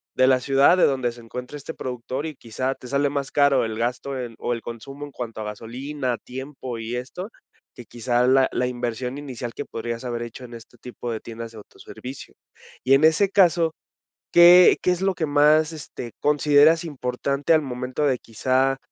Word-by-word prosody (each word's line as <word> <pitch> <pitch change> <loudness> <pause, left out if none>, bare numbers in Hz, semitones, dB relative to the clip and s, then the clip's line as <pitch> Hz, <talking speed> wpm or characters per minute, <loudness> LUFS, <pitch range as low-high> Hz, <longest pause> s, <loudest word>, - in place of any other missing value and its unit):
de 130 - +4
la 130 -1 +4
ciudad 135 +6 +4
de - - +3
donde 130 -3 0
se 120 - -13
encuentra 125 +5 -7
este 145 +3 -8
productor 130 +2 -5
y 155 -2 -5
quizá 130 +3 -3
te 125 - -12
sale 140 +2 +1
más 140 -1 -3
caro 140 -2 +3
el 110 -1 -4
gasto 125 +3 -2
en 120 -2 -6
o - - -2
el 115 - -5
consumo 135 +6 -8
en 145 - -12
cuanto 120 -4 -7
a - - -5
gasolina, 125 +5 -4
tiempo 130 -1 -7
y 115 +2 -4
esto, 155 - -6 0.5
que 120 - -11
quizá 120 +2 0
la 130 0 +4
la 125 - 0
inversión 125 +1 -4
inicial 125 -5 -6
que - - -5
podrías 115 +1 -5
haber 120 -1 -3
hecho 120 +2 -9
en 120 - -12
este 115 +1 -13
tipo 120 0 -7
de 110 - -4
tiendas 115 0 -8
de - - -12
autoservicio. 130 +5 -11 0.5
Y 135 - +4
en 135 - +5
ese 165 +5 +4
caso, 170 -4 +3 0.6
¿qué 175 +1 +8
qué 180 - +3
es 180 0 -2
lo 190 -1 +1
que 165 - -1
más, 150 +2 +4
este, 135 -6 -8
consideras 150 +2 +4
importante 140 +1 -1
al 160 - +4
momento 125 +2 -3
de 130 -3 +1
quizá, 130 +4 0
130 Hz, 195 wpm, -23 LUFS, 120-145 Hz, 0.6 s, qué